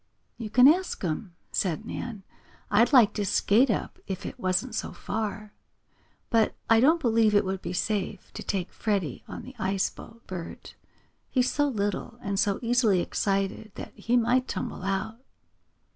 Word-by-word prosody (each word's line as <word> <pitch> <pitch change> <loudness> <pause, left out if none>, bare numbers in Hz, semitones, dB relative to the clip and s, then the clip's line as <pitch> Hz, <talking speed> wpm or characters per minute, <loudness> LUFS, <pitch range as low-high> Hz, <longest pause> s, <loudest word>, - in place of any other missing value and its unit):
"You 225 -3 -5
can 250 +4 +7
ask 355 - +2
him," 175 +2 -3 0.2
said 190 +3 -1
Nan. 225 -3 -6 0.5
"I'd 230 +5 +4
like 245 -7 +6
to 210 - -1
skate 215 +6 +3
up, 215 - -2
if 190 -2 -5
it - - -7
wasn't 185 +7 0
so - - -3
far. 210 -1 -4 0.8
But 225 -2 +3
I 225 0 +6
don't 315 +8 +5
believe 225 -6 +3
it 205 - +4
would 190 0 -3
be - - -5
safe 200 0 -2
to - - -6
take 190 -3 -3
Freddie 195 - -2
on - - -7
the 260 - -10
ice 195 -1 0
boat, 230 0 -14
Bert. 175 -3 -8 0.6
He's 255 -1 +2
so 290 0 +2
little, 210 -1 -2
and 200 -1 -1
so 205 -2 +2
easily 230 -5 +3
excited 195 +3 -1
that - - -8
he 240 +2 0
might 245 +2 +2
tumble 185 - -4
out." 195 +4 -2
215 Hz, 165 wpm, -27 LUFS, 195-235 Hz, 0.8 s, can